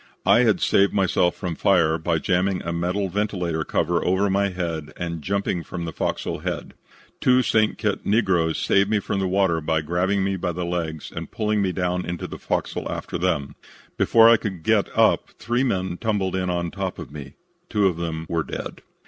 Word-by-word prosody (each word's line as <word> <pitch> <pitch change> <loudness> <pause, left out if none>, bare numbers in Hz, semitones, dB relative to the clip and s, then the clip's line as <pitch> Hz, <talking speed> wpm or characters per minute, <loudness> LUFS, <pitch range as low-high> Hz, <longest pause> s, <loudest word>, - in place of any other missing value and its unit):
"I - - +6
had - - +3
saved 100 0 +3
myself 95 -3 +2
from 90 -2 -4
fire 80 -2 +2
by 80 +1 0
jamming 90 +2 0
a 85 - -3
metal 90 +4 -1
ventilator 90 -4 -1
cover 85 +3 0
over 95 +2 +2
my 100 +1 +2
head 85 -5 -4
and 85 -2 -4
jumping 100 0 -1
from 85 0 -5
the 80 - -5
fo'c's'l - - -2
head. - - -4 0.5
Two 130 0 +4
St. 110 -2 +2
Kitts 105 -3 -1
negroes 95 -7 +2
saved 100 0 +2
me 110 - +2
from 100 0 -2
the 95 - 0
water 95 -3 +2
by 80 0 0
grabbing 90 +5 0
me 95 0 0
by 90 -1 -2
the 90 +1 -3
legs 85 -3 -3
and - - -5
pulling 105 -1 0
me 95 -2 +1
down 90 0 -1
into 85 0 -4
the - - -7
fo'c's'l - - -2
after - - -4
them. 70 -1 0 0.4
Before 115 0 +5
I 115 0 +7
could 95 -7 -5
get - - +2
up - - +3
three 120 +2 0
men 95 -7 -1
tumbled 100 -4 -1
in 90 -1 -1
on 85 -1 -1
top 95 -2 -4
of - - -8
me. 70 -3 -9 0.4
Two 105 -1 +2
of 90 -4 +2
them 80 -1 -4
were 85 -1 0
dead. - - -6
90 Hz, 200 wpm, -23 LUFS, 85-100 Hz, 0.5 s, I